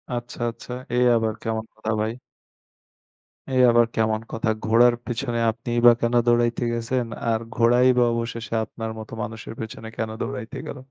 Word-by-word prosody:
আচ্ছা, 120 +2 -6
আচ্ছা, 115 - -10 0.2
এ - - +1 0.2
আবার 110 -1 +1
কেমন 110 0 -2
কথা 110 0 -3
ভাই? 110 +1 0 1.4
এ - - +1 0.2
আবার 120 0 +5
কেমন 110 0 +1
কথা, 110 -1 -1 0.2
ঘোড়ার 120 +2 +5
পেছনে 120 0 -2
আপনিই 120 +1 -3
বা 120 - +11
কেন 120 0 +1
দৌড়াইতে 120 0 +2
গেছেন, 120 +1 -1 0.3
আর 110 - +1 0.2
ঘোড়াই 120 +2 +4
বা 125 - +5
অবশেষে 115 0 -4
আপনার 115 -1 -6
মতো 110 +1 -9
মানুষের 110 +1 -7
পেছনে 110 0 -7
কেন 110 - -2
দৌড়াইতে 110 - -5
গেল? - - -6
115 Hz, 160 wpm, -24 LUFS, 110-120 Hz, 1.4 s, বা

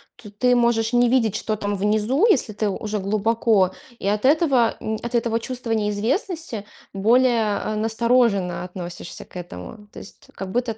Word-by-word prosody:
то 210 - -12
ты 250 +4 +2
можешь 235 -1 +2
не 245 0 +4
видеть, 230 -5 +2
что 215 - -2
там 205 0 -2
внизу, 215 - +2
если 240 - +2
ты 210 0 -1
уже 210 +1 -3
глубоко, 210 -1 +2 0.3
и - - -4
от 210 +3 0
этого, 275 -5 +3
м, 220 0 -3
от 240 +1 -3
этого 230 -1 +1
чувства 245 -1 -6
неизвестности 225 - -1 0.3
более, 225 0 +3
а, 215 - -3
настороженно 220 -5 +1
относишься 180 -1 -8
к - - -23
этому. 175 - -9
То - - -12
есть - - -14
как 195 -1 -6
будто 235 0 -1
220 Hz, 165 wpm, -22 LUFS, 205-240 Hz, 0.3 s, не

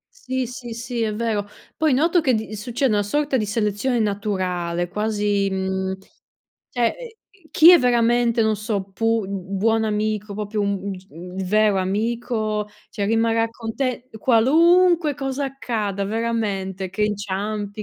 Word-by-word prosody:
Sì, 260 - -3
sì, 240 0 -8
sì, 235 +1 -4
è 215 -1 -1
vero. 215 -2 -1 0.3
Poi 315 -2 +2
noto 330 +7 +3
che 265 -4 +3
di 220 -1 -3
succede 240 +4 -1
una 205 -1 +2
sorta 280 +7 0
di 220 - 0
selezione 215 +3 0
naturale, 185 -5 -1
quasi, 205 -1 0
mhmm, 190 0 -2 0.7
cioè 240 -2 0 0.6
chi 330 +2 +8
è 350 - +8
veramente, 240 -1 +3
non 220 0 +2
so, 210 -1 -2
pu 225 +1 0
buon 200 +4 0
amico, 210 -1 -2
proprio 210 +1 -3
un 200 -1 0
un 200 - -4
g 185 0 -10
un 180 +2 -10
vero 210 -1 +3
amico, 215 +2 -1 0.2
cioè, 200 -1 -2
rimarrà 225 +1 +2
con 225 -1 -7
te, 255 -2 -2
qualunque 325 - +4
cosa 270 0 -3
accada, 220 -7 -3
veramente, 200 -4 -2
che 195 +3 -2
inciampi, 205 0 -2
215 Hz, 145 wpm, -22 LUFS, 200-240 Hz, 0.7 s, chi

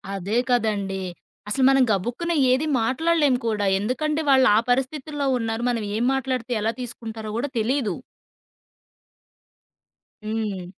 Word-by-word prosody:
అదే 195 +4 -2
కదండీ. 205 -5 0 0.5
అసలు 265 +4 0
మనం 270 -1 +5
గబుకున్న 240 - -1 0.2
ఏది 275 +5 +1
మాట్లాడలేం 290 +3 +2
కూడా. 210 -2 0
ఎందుకంటే 300 +8 -1
వాళ్ళా 265 -5 +6 0.2
పరిస్థితుల్లో 280 +2 -1
ఉన్నారు. 225 0 -2
మనం 230 -3 -1
ఏం 230 - 0
మాట్లాడితే 255 -2 -2
ఎలా 220 - +1
తీసుకుంటారో 225 -3 -7
కూడా 280 +4 -2
తెలీదు. 225 -4 0 2.3
హ్మ్. 215 -4 -3
240 Hz, 110 wpm, -23 LUFS, 215-270 Hz, 2.3 s, వాళ్ళా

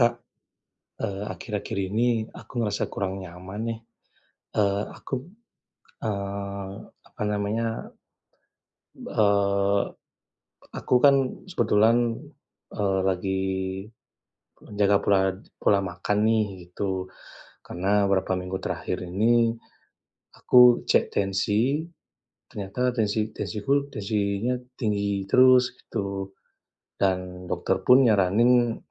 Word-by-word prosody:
Kak, 120 0 +4 0.9
eee, 100 +1 -3
akhir-akhir 105 -3 -5
ini 115 0 +1
aku - - -13
ngerasa 105 -1 -1
kurang 95 -1 -3
nyaman 95 +3 -8
nih. 115 -1 -3 0.8
Eee, 100 -1 +2
aku, - - -12 0.9
eee, 100 -1 -4 0.3
apa - - -14
namanya, 105 +2 -2 1.1
eee, 100 -1 +2 0.9
aku - - -3
kan, 140 -1 +7 0.4
kebetulan, 115 -1 +3 0.6
eee, 95 -2 0
lagi 95 +1 -1 1.2
menjaga 100 -1 +2
pola 100 -1 +4 0.4
pola 100 - +3
makan 90 +3 -2
nih, 110 0 +3 0.3
gitu. 95 -1 -3 0.5
Karena 100 +3 +1
beberapa 95 -1 +1
minggu 90 +1 -4
terakhir - - -3
ini, 115 +5 +2 0.8
aku 125 -1 +6
cek - - +2
tensi, 105 +9 +1 0.6
ternyata 120 +5 -2
tensi 110 -1 -1
tensiku, 140 +6 -1
tensinya 105 +2 -1 0.2
tinggi 100 -3 -1
terus 130 +2 +5
gitu. 100 -1 -5 0.7
Dan 90 -1 -1
dokter - - -1
pun 130 +2 +7
nyaranin 115 +3 +3
100 Hz, 95 wpm, -25 LUFS, 100-115 Hz, 1.2 s, kan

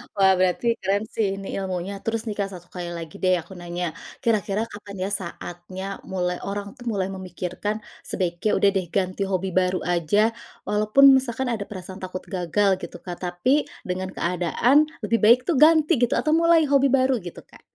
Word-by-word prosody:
Wah, 195 -1 +5
berarti 185 +6 +2
keren 200 +2 +1
sih 200 -3 -1
ini, 195 0 -8
ilmunya. 185 0 -3
Terus 225 0 -1
nih, 210 - -3
Kak, 195 -1 0
satu 175 -1 -11
kali 175 -1 -5
lagi 165 -2 -7
deh, 185 0 +4
aku 170 - -18
nanya. 175 -1 -4 0.3
Kira-kira 215 -2 +1
kapan, 205 -1 -10
ya, 195 - -1
saatnya 185 0 -5
mulai 180 -1 -2
orang 200 0 -4
tuh 245 - -12
mulai 195 -2 -1
memikirkan, 185 +2 -4 0.3
sebaiknya, 180 +2 -1
"Udah 200 - +4
deh, 190 -2 -1
ganti 190 0 0
hobi 190 0 -1
baru 185 0 +1
aja." 180 +6 +2 0.4
Walaupun 215 +7 +6
misalkan 255 0 -2
ada 215 -4 -2
perasaan 185 -1 -8
takut 185 0 -5
gagal, 190 +1 +1
gitu - - -8
Kak. 175 -2 -7
Tapi 240 +12 +1 0.2
dengan 185 +1 -3
keadaan, 180 - +2 0.2
lebih 225 +2 +1
baik 235 +3 +7
tuh 320 - +2
ganti, 310 -1 +5
gitu. 245 - +2
Atau 305 - +1
mulai 335 -1 +5
hobi 275 -1 +4
baru, 260 -1 +3
gitu, 175 -3 -9
Kak. - - -19
195 Hz, 180 wpm, -24 LUFS, 180-225 Hz, 0.4 s, baik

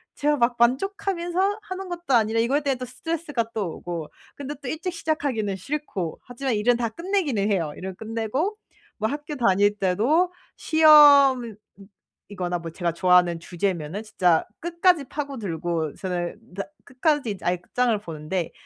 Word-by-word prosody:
제가 295 0 +1
막 240 0 +2
만족하면서 375 - 0
하는 380 -2 -7
것도 345 -5 -3
아니라 225 0 +2
이거에 265 +6 +2
대해 280 -2 0
또 255 0 -6
스트레스가 290 -3 -3
또 195 -7 -3
오고 170 -3 -5 0.3
근데 285 +1 -6
또 - - -5
일찍 335 +6 -3
시작하기는 280 - -1
싫고 195 - -4
하지만 250 0 -3
일은 230 +4 +3
다 235 -1 -1
끝내기는 295 - -1
해요. 165 -6 0
일은 190 0 -6
끝내고 230 - -2 0.4
뭐 220 - 0
학교 295 +1 -5
다닐 205 -4 +3
때도 255 - +2 0.2
시험이거나 285 - +6 1.0
뭐 165 -1 -6
제가 170 -1 -2
좋아하는 180 -1 +4
주제면은 175 0 -3
진짜 180 -6 +2 0.2
끝까지 340 -1 +2
파고들고 175 - -3
저는 180 +4 -5
다 195 - -2 0.2
끝까지 255 - 0
아예 180 +1 +1
끝장을 240 +6 0
보는데 165 0 -4
240 Hz, 335 characters per minute, -24 LUFS, 190-300 Hz, 1.0 s, 시험이거나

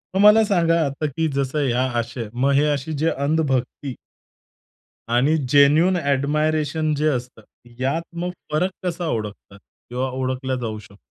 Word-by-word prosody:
मग 190 - +3
मला 210 +2 +7
सांगा 170 -5 +2
आता, 140 +2 -3
की 160 +3 -1
जसं 140 +1 0
ह्या 125 +1 +1 0.2
अशा, 115 -1 -6
मग 135 +3 +2
हे 140 +2 +4
अशी 145 +2 -3
जे 165 - +4
अंधभक्ती 140 -3 -1 1.2
आणि 140 +6 +3
जेन्युइन 150 +6 +5
ॲडमायरेशन 150 +1 0
जे 150 +2 +1
असतं 125 -5 -3 0.4
यात 140 +6 0 0.2
मग 180 - -2 0.2
फरक 180 +5 +1
कसा 175 -1 -2
ओळखतात? 105 -5 -5 0.3
किंवा 130 +2 -2
ओळखला 130 0 -2
जाऊ 110 -2 -4
शकतो? 100 -1 -15
140 Hz, 145 wpm, -22 LUFS, 130-160 Hz, 1.2 s, मला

